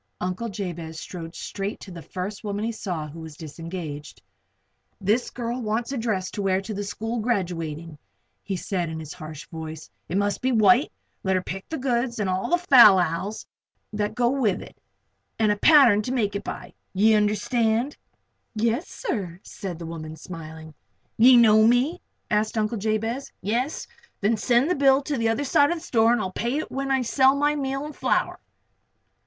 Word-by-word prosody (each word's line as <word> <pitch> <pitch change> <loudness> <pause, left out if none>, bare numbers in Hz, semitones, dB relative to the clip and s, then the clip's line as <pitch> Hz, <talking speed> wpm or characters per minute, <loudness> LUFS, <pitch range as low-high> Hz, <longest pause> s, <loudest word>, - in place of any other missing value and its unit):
Uncle 185 +6 -3
Jabez 170 -5 -5
strode 165 -1 -8
straight 200 +1 -5
to 190 - -10
the 170 -1 -8
first 190 +6 -6
woman 205 0 -2
he 230 - -1
saw 180 -8 -4
who 155 +3 -10
was 160 -2 -9
disengaged. 160 -1 -7 0.8
"This 215 +5 +1
girl 240 0 -4
wants 225 +3 -2
a 275 - -2
dress 200 -5 -1
to 205 - -4
wear 190 -1 +2
to 205 +3 -6
the 205 0 -3
school 225 +3 -4
graduating," 165 -8 -3 0.4
he 195 - -4
said, 180 -1 -2
in 160 0 -5
his 155 -2 -7
harsh 155 -2 -9
voice. 160 - -8 0.2
"It 180 - -1
must 205 0 0
be 260 0 +1
white. 240 +4 +4 0.3
Let 190 -1 +1
her 185 - 0
pick 195 +1 -6
out - - -49
the 320 - -3
goods, 245 -2 -1
all 185 -2 -1
the 350 - +4
fal 255 - +8
lals 180 +4 -1 0.5
that 210 0 -2
go 240 0 +2
with 245 -9 0
it, - - -14 0.6
and 215 -2 +3
a - - +2
pattern 255 -6 +6
to 245 - -4
make 210 -6 0
it 200 - -3
by. - - -7 0.2
Ye 215 +3 +5
understand?" 220 +4 +1 0.6
"Yes, 230 +7 0
sir," 185 - -4
said 190 -5 -7
the 170 - -7
woman, 160 -1 -7
smiling. 160 -2 -9 0.4
"You 245 +2 +7
know 220 -2 +6
me?" 255 +9 +2 0.3
asked 215 +1 +1
Uncle 215 +1 0
Jabez. 225 +5 -2
"Yes? 240 - -2 0.3
Then 210 +3 +2
send 240 +4 +2
the 360 - +2
bill 275 -2 +4
to 295 +1 -2
the 230 -3 +1
other 225 +5 0
side 285 +1 +4
of 345 - 0
the 330 - -10
store 225 -4 +3
and 240 - +2
I'll 190 -3 -3
pay 240 +8 -2
it 310 - -4
when 275 +1 -3
I 265 -1 +2
sell 265 +3 +4
my 295 +1 +2
meal 275 0 -2
and 300 - -8
flour." - - 0
215 Hz, 190 wpm, -25 LUFS, 180-245 Hz, 0.8 s, fal